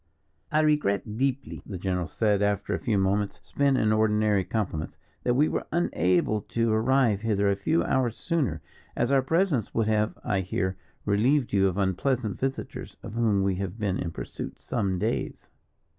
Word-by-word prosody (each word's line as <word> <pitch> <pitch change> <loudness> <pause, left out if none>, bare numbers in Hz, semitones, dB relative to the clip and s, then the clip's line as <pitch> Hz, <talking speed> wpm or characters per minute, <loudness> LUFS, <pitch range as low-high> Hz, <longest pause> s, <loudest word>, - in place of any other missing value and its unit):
"I 155 - +3
regret 110 -9 +1
deeply," 135 +2 -2
the 95 - -6
general 90 -1 -1
said, 105 +4 +1
after 100 -1 0
a - - -1
few 110 -4 0
moments 100 +1 0
spent 140 -2 +1
in 110 -3 +2
ordinary 105 -2 +2
compliments, 90 -7 -3 0.2
"that 125 - +1
we 150 +4 +4
were - - -2
unable 105 - +1
to 115 +1 0
arrive 115 -2 +3
hither 100 -3 +2
a - - +1
few 155 +12 +1
hours 125 -4 0
sooner, 135 - -1 0.3
as 120 - 0
our 135 -1 +5
presence 155 - 0
would 115 - +2
have, 110 0 +1
I 100 - 0
hear, 95 0 -2 0.3
relieved 120 +6 +2
you 95 -1 +4
of 95 0 -2
unpleasant 105 +3 0
visitors, 135 0 -4
of - - -7
whom 110 -4 +2
we 95 -1 0
have 95 +1 -4
been 100 -4 -1
in 85 - -2
pursuit - - -7
some 100 -5 -1
days." 110 +6 -3
105 Hz, 175 wpm, -27 LUFS, 95-130 Hz, 0.3 s, our